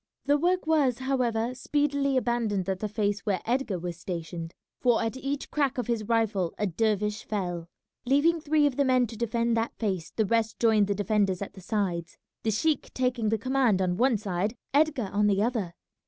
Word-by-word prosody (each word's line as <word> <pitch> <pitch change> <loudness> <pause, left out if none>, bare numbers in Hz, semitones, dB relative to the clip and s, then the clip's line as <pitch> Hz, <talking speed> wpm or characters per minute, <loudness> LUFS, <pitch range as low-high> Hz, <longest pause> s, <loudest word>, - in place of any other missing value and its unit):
The 290 +1 +3
work 360 +2 +1
was, 290 -6 +2
however, 250 -3 0
speedily 280 +1 0
abandoned 225 -6 0
at 190 -1 -1
the 215 - -3
face 205 -1 0
where 195 -1 -1
Edgar 240 -4 0
was 175 -1 -5
stationed, 170 -2 -5 0.2
for 245 -2 +3
at 225 +2 -2
each 275 +2 -4
crack 280 -3 0
of 250 - -1
his 230 -3 -1
rifle 215 -6 0
a 210 - 0
dervish 210 +2 0
fell. 175 -5 -3 0.4
Leaving 295 +6 +3
three 305 0 +3
of 280 -3 0
the 285 - +4
men 255 -2 +3
to 230 0 -8
defend 235 +1 0
that 225 +1 -1
face 190 -7 -2
the 220 - 0
rest 225 +1 0
joined 220 -3 +4
the 200 - 0
defenders 200 -1 +1
at - - -9
the 190 - -12
sides, 180 -4 -2 0.2
the 225 - -1
sheik 300 +9 0
taking 250 -4 0
the 225 - +1
command 255 -3 +2
on 180 -1 +1
one 245 +3 +3
side, 200 +2 -2 0.2
Edgar 285 -8 +2
on 205 +1 +3
the 200 0 +2
other. 215 -8 -2
225 Hz, 195 wpm, -27 LUFS, 200-260 Hz, 0.4 s, the